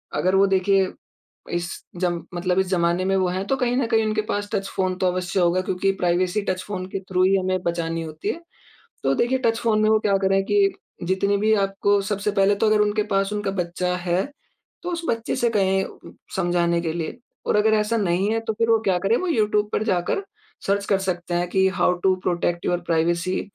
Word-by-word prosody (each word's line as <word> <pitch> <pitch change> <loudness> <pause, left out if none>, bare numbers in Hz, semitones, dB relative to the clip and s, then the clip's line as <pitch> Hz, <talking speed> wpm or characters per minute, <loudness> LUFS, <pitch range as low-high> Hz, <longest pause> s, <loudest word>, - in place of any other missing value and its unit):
अगर 185 +1 +1
वो 195 +1 +5
देखिए 195 0 +3 0.7
इस 175 0 -2 0.3
जम 175 -2 0
मतलब 180 +1 0
इस 190 - +1
ज़माने 175 0 +1
में 195 0 +1
वो 190 -1 +2
हैं 185 +2 -2
तो 270 - +2
कहीं 245 -2 0
न 265 - +1
कहीं 225 -1 +2
उनके 215 0 0
पास 205 0 -2
टच 195 -2 -1
फ़ोन 185 -1 0
तो 185 - +1
अवश्य 180 +1 -2
होगा 175 +1 +3
क्योंकि 185 +1 0
प्राइवेसी, 180 +3 +1
टच 185 -2 -2
फ़ोन 185 -3 -5
के 195 - -3
थ्रू 185 -1 0
ही 190 +1 +4
हमें 185 -1 0
बचानी 165 -1 -2
होती 155 0 -5
है। 335 - -3 0.6
तो - - +2
देखिए 250 +2 +1
टच 225 0 +2
फ़ोन 220 -2 +2
में 215 - +3
वो 220 0 +4
क्या 200 -2 +2
करें 195 0 +2
कि 205 -1 +3 0.3
जितने 190 +3 +1
भी 215 +2 +2
आपको 200 +1 +1
सबसे 205 0 -1
पहले 200 0 +3
तो 200 - 0
अगर 215 0 +3
उनके 210 0 +1
पास 195 +1 +1
उनका 205 -1 -2
बच्चा 180 -1 -2
है, 180 +1 0 0.6
तो 355 - -3
उस 340 -1 -3
बच्चे 230 -1 -1
से 240 - +1
कहें 195 -3 -1 0.2
समझाने 175 -2 +1
के 165 -2 -2
लिए। 165 +3 -4 0.3
और - - +1
अगर 215 +1 +3
ऐसा 215 +2 +1
नहीं 190 -1 +1
है 225 - +1
तो 220 - 0
फिर 230 +1 0
वो 225 - +6
क्या 190 -4 +1
करे? 195 +5 +2
वो 370 - -3
यूट्यूब 210 -8 +1
पर - - 0
जाकर 190 - 0 0.4
सर्च 200 0 +1
कर 200 - +2
सकते 180 -2 -3
हैं 175 +1 0
की 190 +1 +3
how 180 - +4
to 190 -1 +4
protect 175 -1 -1
your 175 - +1
privacy? 170 +2 +1
190 Hz, 220 wpm, -23 LUFS, 180-210 Hz, 0.7 s, वो